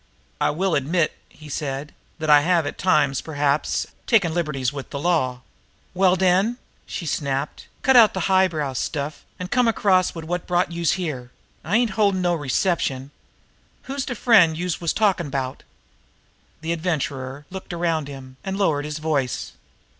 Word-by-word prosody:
"I -, -, +2 dB
will 180 Hz, +4 st, 0 dB
admit," 155 Hz, +4 st, +1 dB
he 155 Hz, -, -14 dB
said, 140 Hz, 0 st, -4 dB, 0.2 s
"that 155 Hz, -1 st, -4 dB
I 150 Hz, -1 st, +7 dB
have 170 Hz, 0 st, +2 dB
at 145 Hz, -, -5 dB
times, 150 Hz, -7 st, +2 dB
perhaps, 145 Hz, -1 st, 0 dB, 0.2 s
taken 195 Hz, -8 st, +3 dB
liberties 150 Hz, -6 st, -1 dB
with 140 Hz, -2 st, -7 dB
the -, -, -5 dB
law." 140 Hz, -6 st, 0 dB, 0.5 s
"Well, 185 Hz, 0 st, +4 dB
den," 190 Hz, +6 st, +2 dB, 0.3 s
she 170 Hz, -, -5 dB
snapped, 140 Hz, -1 st, -2 dB, 0.2 s
"cut 265 Hz, -2 st, +4 dB
out 225 Hz, -5 st, +7 dB
de 190 Hz, -, -1 dB
high 190 Hz, +2 st, +4 dB
brow 150 Hz, -6 st, -3 dB
stuff, 145 Hz, +3 st, -3 dB
an' 180 Hz, 0 st, -6 dB
come 245 Hz, +1 st, +3 dB
across 190 Hz, -5 st, +2 dB
wid 165 Hz, -1 st, -6 dB
wot 175 Hz, +1 st, -3 dB
brought 175 Hz, 0 st, +1 dB
youse 170 Hz, -1 st, +1 dB
here. 150 Hz, -10 st, -4 dB, 0.3 s
I 190 Hz, +8 st, +2 dB
ain't 235 Hz, -2 st, +1 dB
holdin' 200 Hz, -2 st, +2 dB
no 175 Hz, -1 st, +2 dB
reception. 145 Hz, -3 st, -1 dB, 0.7 s
Who's 275 Hz, 0 st, -3 dB
de 250 Hz, -, -4 dB
friend 200 Hz, -9 st, +5 dB
youse 180 Hz, 0 st, -2 dB
was 170 Hz, -, +1 dB
talkin' 195 Hz, -6 st, +1 dB
about?" 135 Hz, -2 st, -3 dB, 1.0 s
The 160 Hz, +1 st, -2 dB
Adventurer 145 Hz, -5 st, -3 dB
looked 190 Hz, 0 st, -7 dB
around 165 Hz, -3 st, -1 dB
him, 130 Hz, -2 st, -10 dB
and 190 Hz, 0 st, -3 dB
lowered 155 Hz, -8 st, +1 dB
his 150 Hz, 0 st, -4 dB
voice. 150 Hz, -5 st, -1 dB
165 Hz, 165 wpm, -23 LUFS, 145-185 Hz, 1.0 s, I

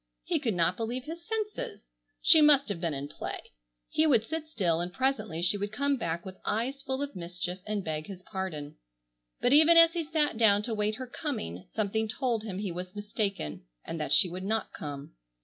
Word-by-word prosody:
He -, -, 0 dB
could 230 Hz, -9 st, -1 dB
not 175 Hz, +1 st, +2 dB
believe 235 Hz, +3 st, -3 dB
his 330 Hz, +4 st, -7 dB
senses! 425 Hz, -, -4 dB, 0.4 s
She 325 Hz, -2 st, +8 dB
must 290 Hz, -4 st, +6 dB
have 185 Hz, -5 st, -3 dB
been 165 Hz, -4 st, 0 dB
in 140 Hz, +1 st, -4 dB
play. 145 Hz, -, -5 dB, 0.5 s
He 315 Hz, +1 st, +2 dB
would 240 Hz, -7 st, +4 dB
sit 320 Hz, +3 st, -4 dB
still 180 Hz, -, +1 dB
and 175 Hz, +1 st, -2 dB
presently 215 Hz, -8 st, -1 dB
she 185 Hz, +3 st, +3 dB
would 205 Hz, +1 st, -3 dB
come 280 Hz, +5 st, +1 dB
back 170 Hz, -8 st, -3 dB
with 190 Hz, 0 st, -8 dB
eyes 250 Hz, +6 st, -1 dB
full 265 Hz, 0 st, -2 dB
of 285 Hz, -, -6 dB
mischief 180 Hz, +1 st, -4 dB
and 210 Hz, -2 st, -1 dB
beg 155 Hz, -1 st, -3 dB
his 190 Hz, -2 st, -9 dB
pardon. 165 Hz, -8 st, -5 dB, 0.6 s
But 245 Hz, -, +4 dB
even 315 Hz, +3 st, +8 dB
as 330 Hz, 0 st, +8 dB
he 340 Hz, -2 st, -1 dB
sat 300 Hz, -5 st, 0 dB
down 210 Hz, -3 st, +5 dB
to 230 Hz, -, -2 dB
wait 210 Hz, 0 st, 0 dB
her 255 Hz, -, -5 dB
coming, 235 Hz, -, -5 dB
something 220 Hz, +1 st, 0 dB
told 230 Hz, 0 st, -1 dB
him 200 Hz, -4 st, -5 dB
he 200 Hz, -2 st, -2 dB
was 180 Hz, +2 st, -6 dB
mistaken 205 Hz, -, -3 dB, 0.2 s
and 165 Hz, -, -5 dB
that 150 Hz, -, -3 dB
she -, -, +6 dB
would 180 Hz, +2 st, -6 dB
not 220 Hz, +1 st, -1 dB
come. 145 Hz, -, -7 dB
210 Hz, 205 wpm, -29 LUFS, 180-275 Hz, 0.6 s, She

